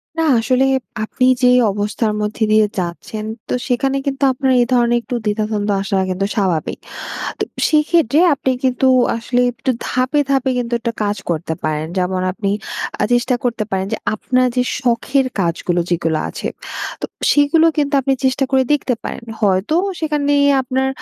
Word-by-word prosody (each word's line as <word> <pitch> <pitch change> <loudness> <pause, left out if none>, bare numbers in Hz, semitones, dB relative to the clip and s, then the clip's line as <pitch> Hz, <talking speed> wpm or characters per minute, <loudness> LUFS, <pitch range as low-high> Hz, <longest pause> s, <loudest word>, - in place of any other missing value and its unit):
না, 325 - 0 0.2
আসলে 255 +4 +2 0.4
আপনি 255 +3 0 0.2
যে 250 - +6 0.2
অবস্থার 210 +2 -1
মধ্যে 210 +1 -2
দিয়ে 215 0 +5
যাচ্ছেন, 185 +5 -5 0.2
তো - - -2
সেখানে 270 +2 +1
কিন্তু 275 0 -2
আপনার 265 +1 0
এই - - +3
ধরনের 240 -1 +3
একটু 245 - -5
দ্বিধা-দ্বন্দ্ব 210 -1 -1
আসাটা 195 -1 0
কিন্তু 185 +2 -1
স্বাভাবিক। 185 -7 -1 0.6
তো - - 0 0.2
সেক্ষেত্রে 305 -2 +3
আপনি 270 -1 -1
কিন্তু 260 0 +2 0.3
আসলে 245 +2 0
একটু 245 +2 -2 0.2
ধাপে, 255 +4 +1
ধাপে 270 -1 +2
কিন্তু 240 -1 -2
একটা 235 0 -3
কাজ 205 0 -1
করতে 160 -1 -1
পারেন। 155 0 -1
যেমন 185 0 0
আপনি 200 0 -3 0.5
আ - - +3
চেষ্টা 245 +1 +2
করতে 235 -3 0
পারেন 190 0 0
যে - - -1 0.2
আপনার 255 +4 +1
যে 250 - +2 0.2
শখের 255 +2 +1
কাজগুলো, 175 0 0
যেগুলো 165 -2 0
আছে। - - -5 0.5
তো - - -1 0.3
সেগুলো 295 +3 +4
কিন্তু 290 -1 0
আপনি 270 +1 +1
চেষ্টা 265 +1 +1
করে 265 -1 +4
দেখতে 275 -3 0
পারেন। - - -6 0.2
হয়তো 200 +8 +2 0.2
সেখানে 295 -2 0 0.3
আপনার 260 +1 -1
240 Hz, 160 wpm, -18 LUFS, 205-265 Hz, 0.6 s, যে